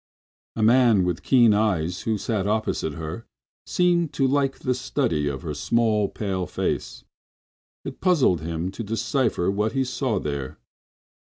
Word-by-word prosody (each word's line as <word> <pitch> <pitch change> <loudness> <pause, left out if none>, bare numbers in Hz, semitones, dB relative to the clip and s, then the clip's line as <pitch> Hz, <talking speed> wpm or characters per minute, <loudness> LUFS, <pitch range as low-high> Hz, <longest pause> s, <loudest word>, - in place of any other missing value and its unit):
A 110 - -1
man 115 -3 +5
with 90 -2 -2
keen 120 -5 +5
eyes, 90 -5 0
who 110 - +1
sat 100 -1 -2
opposite 110 -5 -1
to - - -10
her, 80 +9 -6 0.4
seemed 175 -3 +2
to 135 - +1
like 135 0 +1
the 125 - -1
study 125 - -1
of 70 +1 -4
her 80 -3 -4
small, 110 +4 +1
pale 95 -4 -3
face. - - -3 0.8
It - - -7
puzzled 145 - +3
him 85 +3 -3
to 115 - -6
decipher 115 -2 0
what 105 +3 -1
he 135 -1 +1
saw 130 -3 -1
there. 70 -4 -4
110 Hz, 155 wpm, -24 LUFS, 90-125 Hz, 0.8 s, man